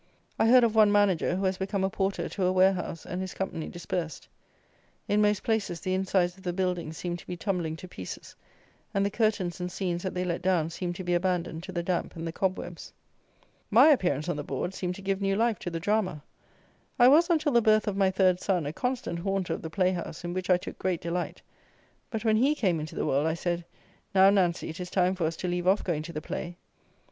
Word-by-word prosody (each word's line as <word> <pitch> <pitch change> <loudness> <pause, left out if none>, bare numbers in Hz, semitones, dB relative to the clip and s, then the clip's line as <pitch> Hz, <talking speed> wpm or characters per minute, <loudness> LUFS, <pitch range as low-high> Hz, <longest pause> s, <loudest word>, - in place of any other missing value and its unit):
I - - +4
heard 250 +1 +7
of 230 -2 +3
one 215 -2 +6
manager 200 -4 +3
who 190 +1 -1
has 185 0 0
become 195 0 -1
a 190 - +2
porter 195 +1 -1
to 190 - -2
a 180 - +3
warehouse, 185 -3 +1
and 180 +1 -4
his 190 - -5
company 190 -4 -3
dispersed. 170 -3 -4 0.8
In 210 +1 +2
most 210 -1 +2
places 215 -6 -1
the 185 - -2
insides 185 -2 +1
of 190 - -17
the 175 -2 -2
buildings 180 -4 -2
seem 175 -1 -3
to - - -15
be 180 - -5
tumbling 175 -4 -2
to 185 - -10
pieces; 95 - -8 0.6
and 195 0 +2
the 200 - 0
curtains 210 -6 0
and 180 0 -3
scenes 175 -2 -2
that 190 0 -4
they 180 0 -1
let 170 -1 -2
down 175 -3 +1
seem 175 +1 -3
to 185 - -7
be 175 0 0
abandoned 175 -2 0
to 185 - -8
the 170 -1 -2
damp 175 0 -2
and 165 0 -5
the 165 - -3
cobwebs. 180 -1 -3 0.8
My - - +7
appearance 175 - +2
on 175 - -1
the 145 - -3
boards 180 +5 -3
seemed 180 -1 -3
to 195 - -11
give 195 0 -1
new 195 0 +1
life 225 -1 +1
to - - -4
the 165 -1 -4
drama. 185 -5 0 0.7
I 245 - +7
was, 320 +7 +6
until 310 -3 +2
the 240 -2 +4
birth 215 -1 +3
of 205 - 0
my 195 -1 +3
third 185 -1 +3
son, 180 -6 0
a 145 - -3
constant 250 -7 -2
haunter 195 0 -1
of - - -5
the 160 - -5
playhouse, 180 0 -1
in 175 0 -4
which 185 0 -4
I 180 - +6
took - - -9
great 185 -3 -1
delight; 170 +1 -3 0.7
but 220 0 -4
when 215 -1 +4
he 275 +6 +3
came 185 - +1
into 155 0 -6
the - - -1
world 140 +3 +1
I 160 - 0
said, 175 0 -2 0.5
"Now, 190 +1 +7
Nancy, 180 -4 +1
it 160 +4 -7
is 180 -1 -5
time 180 0 +2
for 175 -4 -1
us 165 - -3
to 180 - -4
leave 175 0 -1
off 195 +2 +3
going 165 -4 -1
to 155 - -7
the 155 -2 -5
play." 175 +2 -5
185 Hz, 235 wpm, -28 LUFS, 175-195 Hz, 0.8 s, heard